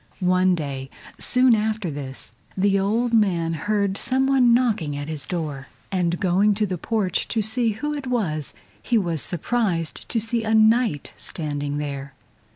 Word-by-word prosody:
One 185 0 +3
day, 135 -4 -5 0.3
soon 250 -1 +4
after 215 -4 0
this, 135 -2 -6 0.3
the 195 +1 +3
old 230 +5 0
man 175 -7 +2
heard 200 +3 -1
some 260 +1 +2
one 265 -3 +4
knocking 220 - +1
at 145 0 -5
his 150 -3 -4
door, 150 -6 -4 0.2
and 175 -2 0
going 195 +3 +3
to 210 +1 +1
the 180 -3 -4
porch 210 -4 -1
to 220 -2 -1
see 225 +1 +2
who 295 +8 -3
it 285 -3 -5
was 170 - -1 0.3
he 240 - +1
was 170 -7 0
surprised 175 -3 -1
to 230 - 0
see 225 +1 0
a 220 0 +1
Knight 220 - +3
standing 145 -3 -3
there. 140 -2 -5
195 Hz, 160 wpm, -23 LUFS, 155-225 Hz, 0.3 s, soon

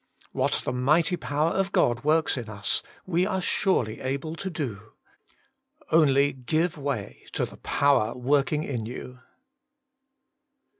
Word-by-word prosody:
4. - - -3
What - - +2
the - - 0
mighty 155 +8 +3
power 145 +3 0
of 195 0 0
God 120 - +2
works 155 +2 +3
In 120 -4 -5
us 105 -1 0 0.2
we 180 -1 +1
are 190 -2 -1
surely 175 - 0
able 140 +5 -3
to 190 +3 -4
do. 115 - -5 1.0
Only 145 -3 +4
give 155 +7 0
way 140 -9 -4
to - - 0
the - - -12
power 135 -6 +2
working 140 +4 +1
in 120 -7 -3
you. 125 +1 -8
140 Hz, 140 wpm, -26 LUFS, 125-160 Hz, 1.0 s, Only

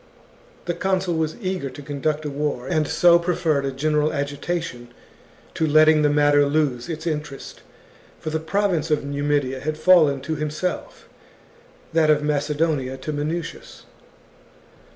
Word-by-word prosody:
The 175 - -1
consul 190 -1 -1
was 160 -1 -1
eager 185 - -3
to 140 - -10
conduct 150 +2 -2
a - - -2
war, 140 -3 -3
and 155 -4 0
so 170 +2 +5
preferred 165 -5 0
a 135 - -1
general 150 +2 0
agitation 145 -2 -4 0.7
to 160 - 0
letting 155 +1 +5
the 150 - +3
matter 145 0 +4
lose 140 -3 0
its 160 0 -5
interest; 150 -4 -5 0.6
for 155 - -5
the 160 - -1
province 170 -1 0
of 150 -2 +1
Numidia 140 -2 -1
had 155 +3 -3
fallen 155 -4 +5
to 160 +4 -3
himself, 155 +4 -4 0.9
that 160 -1 +3
of 150 -1 +3
Macedonia 150 -2 -1
to 140 +4 -5
Minucius. 165 - -5
150 Hz, 140 wpm, -22 LUFS, 145-165 Hz, 0.9 s, so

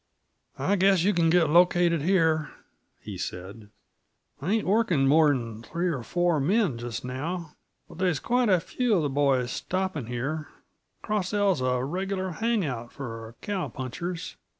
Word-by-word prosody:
"I 200 - +1
guess 190 -2 +4
you 205 +2 +3
can 170 -2 +3
get 165 -3 +3
located 175 -1 +4
here," 160 -3 +2 0.5
he - - -8
said. 100 +4 -7 0.7
"I 175 +9 0
ain't 225 - +1
workin' 185 -9 +2
more'n 135 -7 +2
three 170 +8 -2
or 140 -7 -2
four 175 +5 +1
men 170 - +1
just 120 0 -5
now, 155 +6 -4 0.3
but - - -13
there's 180 -6 +1
quite 245 -1 +1
a 185 -2 +5
few 235 +4 0
uh - - +1
the 145 - 0
boys 135 -3 +1
stopping 185 -9 -3
here; 135 +6 -3
the - - -23
Cross 210 -2 -1
L's 200 -8 +2
a 125 -1 0
regular 185 +5 -2
hang 225 +1 0
out 120 -4 -5
for 115 -3 -8
cow 200 -3 -2
punchers. 165 +7 -5
165 Hz, 160 wpm, -27 LUFS, 130-190 Hz, 0.7 s, a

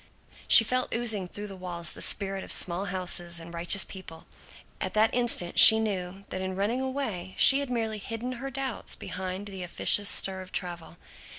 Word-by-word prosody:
She - - +8
felt 255 +2 -2
oozing 220 -5 +1
through 205 +3 -9
the 195 -2 -10
walls 175 -3 -2
the - - -9
spirit 195 -1 +1
of - - -8
small 180 +2 0
houses 175 -2 0
and 165 +1 -12
righteous 170 +3 +4
people. 175 -4 -12 0.6
At - - -4
that 215 +1 +2
instant 235 -8 0
she 220 - +10
knew 195 -2 -5
that 185 - -6
in 190 0 -5
running 210 +7 -2
away 230 -9 -5
she 275 - +6
had 280 -2 -4
merely 225 -3 -3
hidden 225 +4 -7
her 270 - -5
doubts 265 -3 -4
behind 185 +1 -7
the 195 -2 -9
officious 200 +3 0
stir 190 -1 -2
of 185 0 -13
travel. 175 -2 -6
195 Hz, 185 wpm, -26 LUFS, 180-225 Hz, 0.6 s, she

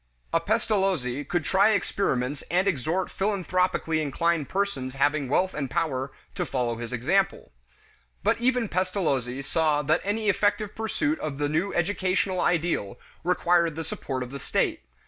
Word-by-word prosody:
A 165 - +4
Pestalozzi 190 - 0
could 160 +3 -1
try 200 +3 +4
experiments 140 -10 0
and 185 +3 +2
exhort 175 +2 0
philanthropically 185 -5 0
inclined 155 +1 0
persons 145 -10 -2
having 145 0 +1
wealth 185 +6 +2
and 140 -3 -3
power 135 -4 -1 0.2
to - - -1
follow 120 -3 -1
his 120 +1 -6
example. 175 +11 0 0.7
But - - +2
even 250 -2 +2
Pestalozzi 155 - -1
saw 150 0 +1
that 155 +4 +2
any 210 +2 -1
effective 205 +1 +1
pursuit 290 +8 -1
of 145 -3 -4
the 145 0 0
new 165 +7 0
educational 185 +1 +1
ideal 165 - 0 0.2
required 175 -2 +2
the 165 - -3
support 130 -4 -4
of 125 - -9
the 140 - -6
state. - - 0
170 Hz, 145 wpm, -26 LUFS, 140-195 Hz, 0.7 s, A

